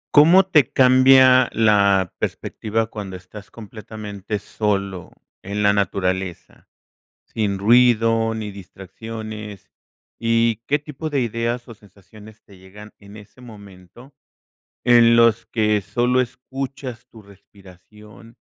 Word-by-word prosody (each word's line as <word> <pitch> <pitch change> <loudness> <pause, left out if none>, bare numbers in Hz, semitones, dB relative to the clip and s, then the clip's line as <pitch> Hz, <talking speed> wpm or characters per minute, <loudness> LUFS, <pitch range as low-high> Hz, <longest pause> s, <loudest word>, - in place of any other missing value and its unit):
¿Cómo 170 +6 +6
te 150 -8 +2
cambia 130 -1 +5
la 100 -4 +2
perspectiva, 110 +1 -3
cuando 105 -4 -8
estás 95 +3 -13
completamente 105 -2 -8
solo, 100 -4 -4 0.3
en 100 +2 -4
la 100 0 +4
naturaleza?, 95 -2 -3 0.6
sin 100 -3 -3
ruido, 115 0 +3
ni 110 -2 -5
distracciones, 105 +2 -10 0.5
y, 115 -1 0
¿qué 145 +1 +1
tipo 150 +1 -8
de 140 - 0
ideas 120 +1 -3
o 115 - -11
sensaciones, 105 +2 -18
te 100 - -19
llegan 100 +3 -15
en 100 0 -16
ese 105 +4 -17
momento, 105 +2 -15 0.7
en 120 -1 +5
los 115 -1 +3
que 105 -2 0
sólo 120 +6 0
escuchas 130 0 -7
tu 110 - -15
respiración, 100 +3 -18
110 Hz, 115 wpm, -20 LUFS, 100-120 Hz, 0.7 s, Cómo